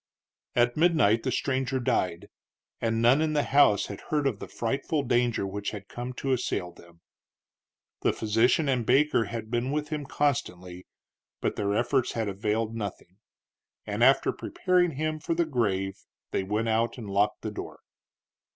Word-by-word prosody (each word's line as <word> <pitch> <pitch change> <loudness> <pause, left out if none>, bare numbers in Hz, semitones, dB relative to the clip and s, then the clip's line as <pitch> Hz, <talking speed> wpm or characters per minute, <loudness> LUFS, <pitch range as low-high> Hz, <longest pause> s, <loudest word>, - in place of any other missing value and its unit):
At 120 0 +3
midnight 155 -10 +3
the 130 - -2
stranger 130 0 -1
died, 95 -9 -1 0.5
and 115 0 0
none 130 +6 +5
in 155 -1 +1
the 145 -1 +2
house 130 -6 +4
had - - -8
heard 150 -2 +1
of 120 -7 0
the - - -7
frightful 135 +5 -2
danger 120 -4 +1
which 100 +1 -3
had 100 -2 -8
come 120 +1 -6
to 135 +2 -3
assail 120 -8 -1
them. 85 -1 -18 1.0
The - - +3
physician 115 +7 +2
and 130 -3 +1
Baker 135 0 +3
had 110 +1 -6
been 120 +2 0
with 150 +1 -2
him 150 -3 -4
constantly, 90 -12 -2 0.5
but - - -1
their 100 0 -1
efforts 120 +2 +1
had 115 -2 -1
availed 105 +3 -1
nothing; 100 -4 -6 0.7
and 105 +2 -1
after 135 +2 +5
preparing 180 -3 +1
him 155 +2 -2
for 165 +2 -2
the 170 0 +2
grave 100 -9 -1 0.3
they - - 0
went 105 +4 -1
out 115 +3 +1
and 115 -4 -7
locked 105 +2 0
the 110 - -3
door. - - -8
120 Hz, 165 wpm, -27 LUFS, 105-140 Hz, 1.0 s, none